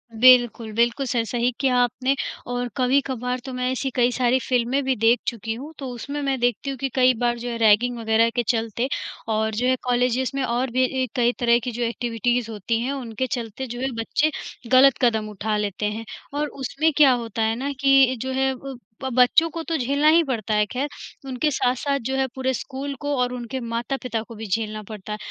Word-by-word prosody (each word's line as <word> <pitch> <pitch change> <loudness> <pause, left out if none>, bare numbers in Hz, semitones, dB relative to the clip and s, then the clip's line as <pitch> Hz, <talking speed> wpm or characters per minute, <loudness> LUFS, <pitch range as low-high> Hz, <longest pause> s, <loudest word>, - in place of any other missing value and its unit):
बिल्कुल, 240 -2 +5
बिल्कुल 235 +4 +1
सर 240 -2 0
सही 240 +2 0
किया 265 -2 +2
आपने। 250 +2 +1 0.3
और 245 0 -2
कभी-कभार 255 -1 0
तो 265 - -6
मैं 250 0 -1
ऐसी 260 +1 -2
कई 245 0 +3
सारी 250 +1 +2
फिल्में 250 +2 +1
भी 265 0 +1
देख 230 +2 +3
चुकी 225 -1 -2
हूँ, 280 +7 -8
तो 270 - -5
उसमें 280 +5 -5
मैं 275 -2 -1
देखती 245 +3 0
हूँ 270 - -4
कि 270 +2 -2
कई 255 -1 +5
बार 240 -1 +1
जो 245 +1 -4
है 235 - -3
रैगिंग 230 +2 +4
वगैरह 225 +1 +3
के 240 - +1
चलते 230 +1 0 0.4
और 220 0 0
जो 245 +3 0
है 260 - +3
कॉलेजेस 250 +1 +1
में 275 - 0
और 250 +1 0
भी 255 +2 +2 0.2
ई - - +1
कई 240 -1 +3
तरह 235 -1 +4
की 245 - -3
जो 240 +1 -3
एक्टिविटीज़ 235 0 -1
होती 220 +2 -2
हैं 255 +3 -1
उनके 260 -2 -3
चलते 235 +3 -5
जो 240 0 -6
है 265 0 -1
बच्चे 305 +7 +1 0.4
ग़लत 260 +1 +6
कदम 220 -3 +2
उठा 210 +1 -2
लेते 210 0 -2
हैं। 215 +2 -3 0.3
और 295 +1 -1
उसमें 295 +3 -1
क्या 285 -4 +7
होता 230 -2 -2
है 220 +1 +1
ना 270 +4 -3
कि 270 -2 +5
जो 260 - -3
है 265 0 +1
अ, - - -8 0.5
ब 265 - -2
बच्चों 255 +7 +5
को 330 - -2
तो 330 - 0
झेलना 280 +3 +1
ही 330 +1 +5
पड़ता 225 -6 -2
है 210 0 +3
खैर, 260 +7 -3 0.4
उनके 265 +3 0
साथ-साथ 275 +2 0
जो 265 +1 -1
है 265 - +2
पूरे 260 0 0
स्कूल 275 +2 -5
को 290 0 -1
और 250 0 0
उनके 250 +1 -5
माता-पिता 235 0 -3
को 230 +1 -11
भी 220 - -7
झेलना 215 +2 -2
पड़ता 210 0 -9
है। - - -4
245 Hz, 215 wpm, -23 LUFS, 230-265 Hz, 0.5 s, क्या